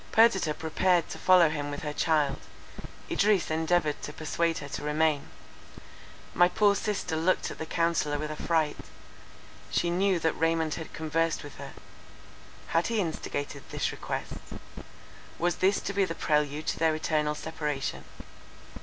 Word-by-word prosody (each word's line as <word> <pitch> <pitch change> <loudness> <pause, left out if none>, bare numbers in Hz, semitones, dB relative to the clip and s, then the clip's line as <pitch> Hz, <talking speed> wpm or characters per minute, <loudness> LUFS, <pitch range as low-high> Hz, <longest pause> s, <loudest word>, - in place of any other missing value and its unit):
Perdita 195 -9 +4
prepared 170 +2 +1
to - - -7
follow 180 -2 +6
him 145 -2 -3
with 145 +2 -5
her 150 -1 -3
child. 150 -3 +1 0.7
Idris 200 -5 +2
endeavoured 160 -1 +1
to - - -5
persuade 165 +2 -1
her 145 - -6
to - - -5
remain. 150 - +1 1.0
My 175 0 +6
poor 205 +2 +4
sister 200 -5 -2
looked 165 +4 +1
at - - -9
the 160 - -4
counsellor 165 -3 +1
with 155 +1 -4
affright. 155 0 0 0.9
She 170 - +1
knew 190 +1 +2
that 160 -1 +1
Raymond 165 -1 +1
had 160 - -6
conversed 165 +1 -1
with 145 - -10
her; 140 0 -8 1.0
had 165 +1 +2
he 230 -2 0
instigated 145 -5 -3
this - - -1
request?—was 175 +1 -6
this 195 +2 +3
to 200 - -3
be 200 0 +2
the 165 -3 -2
prelude 150 0 0
to - - -2
their 160 -1 +3
eternal 150 -1 0
separation? 150 - -3
160 Hz, 145 wpm, -28 LUFS, 150-175 Hz, 1.0 s, follow